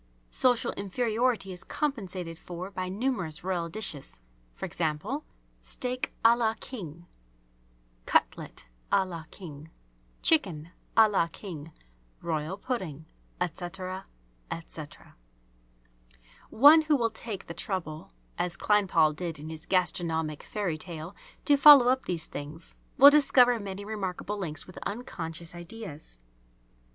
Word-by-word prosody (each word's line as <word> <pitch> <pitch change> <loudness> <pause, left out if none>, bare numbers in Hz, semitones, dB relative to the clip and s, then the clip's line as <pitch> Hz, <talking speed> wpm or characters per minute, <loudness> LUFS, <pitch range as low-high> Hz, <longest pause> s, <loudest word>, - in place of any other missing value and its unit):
Social 250 -2 +3
inferiority 220 0 0
is 180 - -9
compensated 190 - -3
for 180 +2 -7
by 185 -1 -3
numerous 190 - -2
royal 175 -2 -1
dishes... 160 - -3 0.4
e.g., 160 -3 0 0.7
steak 250 0 -3
a 230 +1 +8
la 225 -2 +1
king, 170 - -8 1.0
cutlet - - 0 0.3
a 195 - +4
la 170 -3 -7
king, 155 -4 -10 0.5
chicken 175 - +3 0.3
a 220 -1 +9
la 195 -5 +2
king, 165 -3 -8 0.5
royal 160 +2 -2
pudding, 185 - -4 0.3
etc., 185 +2 -4 0.4
etc. 160 -2 -9 1.3
One 290 +7 +8
who 310 -1 +2
will 230 -4 +1
take 220 -3 -6
the - - -7
trouble, 165 - -4 0.3
as 175 -1 -1
Kleinpaul 180 -7 +3
did 170 -1 -4
in 150 +2 -8
his 160 0 -9
"Gastronomic 165 -4 0
Fairy 185 -7 -3
tale," 170 +2 -6 0.3
to 290 - +6
follow 280 -3 +9
up 260 +1 +1
these 170 -3 -2
things, 150 +3 -7 0.2
will 280 +2 +11
discover 250 -5 +5
many 200 0 -6
remarkable 205 -1 -4
links 155 -5 -2
with 185 - -11
unconscious 170 -7 -5
ideas. 175 - -8
185 Hz, 120 wpm, -29 LUFS, 165-225 Hz, 1.3 s, will